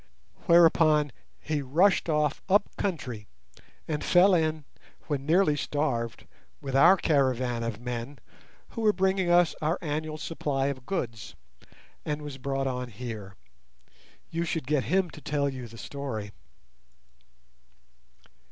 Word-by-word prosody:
Whereupon 160 Hz, -4 st, +5 dB, 0.3 s
he 150 Hz, -2 st, -2 dB
rushed 170 Hz, +8 st, +2 dB
off 150 Hz, -1 st, +1 dB
up 200 Hz, +2 st, +2 dB
country, 125 Hz, -, -4 dB, 0.6 s
and 150 Hz, -2 st, -2 dB
fell 185 Hz, +2 st, +5 dB
in, 155 Hz, -3 st, +1 dB, 0.4 s
when 140 Hz, -2 st, -3 dB
nearly 165 Hz, -2 st, +4 dB
starved, 135 Hz, -6 st, -2 dB, 0.3 s
with 135 Hz, -1 st, -5 dB
our 175 Hz, +8 st, +7 dB
caravan 130 Hz, -7 st, +1 dB
of 115 Hz, -2 st, -4 dB
men, 120 Hz, +3 st, -5 dB, 0.5 s
who 230 Hz, -, -6 dB
were 215 Hz, -1 st, +4 dB
bringing 190 Hz, -1 st, +1 dB
us 175 Hz, -1 st, +4 dB
our 155 Hz, +4 st, +1 dB
annual 155 Hz, 0 st, -3 dB
supply 140 Hz, -4 st, -2 dB
of 130 Hz, -3 st, -6 dB
goods, 115 Hz, -, -4 dB, 0.7 s
and 150 Hz, 0 st, -3 dB
was 145 Hz, -2 st, -7 dB
brought 135 Hz, +1 st, -2 dB
on 125 Hz, -1 st, -3 dB
here. 105 Hz, -3 st, -7 dB, 1.0 s
You 165 Hz, +1 st, -1 dB
should 165 Hz, -3 st, -2 dB
get 145 Hz, -1 st, 0 dB
him 185 Hz, +1 st, +1 dB
to 155 Hz, -, -12 dB
tell 145 Hz, -1 st, 0 dB
you 130 Hz, -3 st, -5 dB
the 115 Hz, +1 st, -13 dB
story." 115 Hz, -7 st, -5 dB
145 Hz, 130 wpm, -27 LUFS, 130-165 Hz, 1.0 s, our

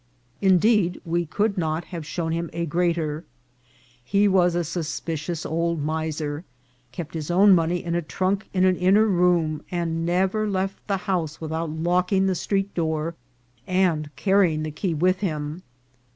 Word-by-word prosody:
Indeed, 190 Hz, -1 st, +3 dB
we 170 Hz, 0 st, -1 dB
could 200 Hz, +4 st, 0 dB
not 160 Hz, 0 st, -1 dB
have 165 Hz, -3 st, -5 dB
shown 165 Hz, -1 st, -2 dB
him 170 Hz, 0 st, -2 dB
a 170 Hz, +1 st, -2 dB
greater. 165 Hz, -1 st, 0 dB, 0.8 s
He 200 Hz, +11 st, +3 dB
was 180 Hz, -3 st, +3 dB
a 175 Hz, -, +1 dB
suspicious 165 Hz, 0 st, -4 dB
old 170 Hz, 0 st, -1 dB
miser, 155 Hz, 0 st, -2 dB, 0.5 s
kept 160 Hz, +4 st, -7 dB
his 155 Hz, -2 st, -4 dB
own 195 Hz, +3 st, +6 dB
money 170 Hz, 0 st, +1 dB
in 170 Hz, -, -3 dB
a 175 Hz, -, +1 dB
trunk 190 Hz, +5 st, -2 dB
in 185 Hz, -1 st, +2 dB
an 185 Hz, -1 st, +3 dB
inner 195 Hz, +4 st, +4 dB
room, 175 Hz, -6 st, +2 dB
and 165 Hz, -2 st, -2 dB
never 190 Hz, +5 st, +1 dB
left 195 Hz, 0 st, -3 dB
the 200 Hz, -2 st, +1 dB
house 170 Hz, -6 st, -1 dB
with 160 Hz, -1 st, -6 dB
out 165 Hz, 0 st, -2 dB
locking 180 Hz, +4 st, +1 dB
the 190 Hz, -, +2 dB
street 195 Hz, +2 st, -1 dB
door 160 Hz, -1 st, -1 dB, 0.5 s
and 180 Hz, -5 st, +1 dB
carrying 190 Hz, -6 st, +2 dB
the 155 Hz, -, -3 dB
key 165 Hz, +3 st, -2 dB
with 185 Hz, +4 st, +2 dB
him. 155 Hz, -3 st, -3 dB
175 Hz, 160 wpm, -24 LUFS, 160-185 Hz, 0.8 s, own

